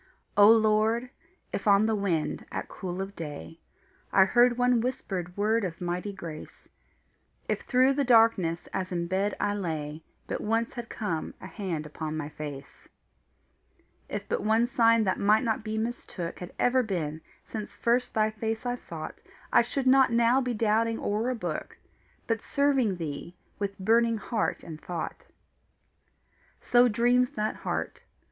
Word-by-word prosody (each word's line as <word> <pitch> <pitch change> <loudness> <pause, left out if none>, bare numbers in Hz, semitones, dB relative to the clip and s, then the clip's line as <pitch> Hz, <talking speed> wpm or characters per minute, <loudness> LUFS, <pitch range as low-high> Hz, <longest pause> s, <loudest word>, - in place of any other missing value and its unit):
O 205 0 +8
Lord, 220 +2 +3 0.4
if 200 - -3
on 200 +1 +6
the 220 - +1
wind, 190 -7 -1
at - - -4
cool 185 0 -5
of 195 +1 -9
day, 160 +1 -7 0.5
I 190 - +6
heard 240 +4 +4
one 245 -1 +3
whispered 190 -8 -4
word 215 +2 +2
of 170 -3 -4
mighty 180 +3 -3
grace; 165 -5 -9 0.8
If - - -1
through 260 +1 +3
the 285 +1 +1
darkness, 225 -9 +4
as 185 -1 -2
in 170 -1 -1
bed 190 +3 0
I 205 0 +1
lay, 160 -5 -4 0.2
But - - -4
once 225 +2 0
had 240 -2 -7
come 170 -8 -3
a - - -10
hand 175 -8 -4
upon 155 +1 -5
my 150 -1 -4
face; 145 -2 -9 1.2
If - - -4
but - - -1
one 220 +2 +3
sign 230 -2 +4
that 190 -2 0
might 215 +3 +4
not 225 -2 -1
be 215 0 -3
mistook, 220 -6 -4
Had 180 0 -7
ever 255 +1 +3
been, 165 -8 -3 0.2
since 215 -2 -6
first 245 +1 +1
thy 215 0 +2
face 220 +2 -3
I 245 - 0
sought, 165 -10 -8 0.3
I - - +7
should 260 +3 -2
not 265 0 +5
now 235 +3 +4
be 250 -2 -2
doubting 225 +1 +1
o'er 215 +4 -1
a 255 - -1
book, 225 - -5 0.5
But 225 -1 -1
serving 270 -8 +1
thee 165 +1 -6 0.2
with 200 -1 -3
burning 230 +3 +3
heart 215 +1 -2
and 160 -2 -9
thought. 170 -3 -5 1.3
So 245 0 +4
dreams 245 +2 +3
that 215 -2 -1
heart. - - -3
215 Hz, 160 wpm, -28 LUFS, 180-235 Hz, 1.3 s, O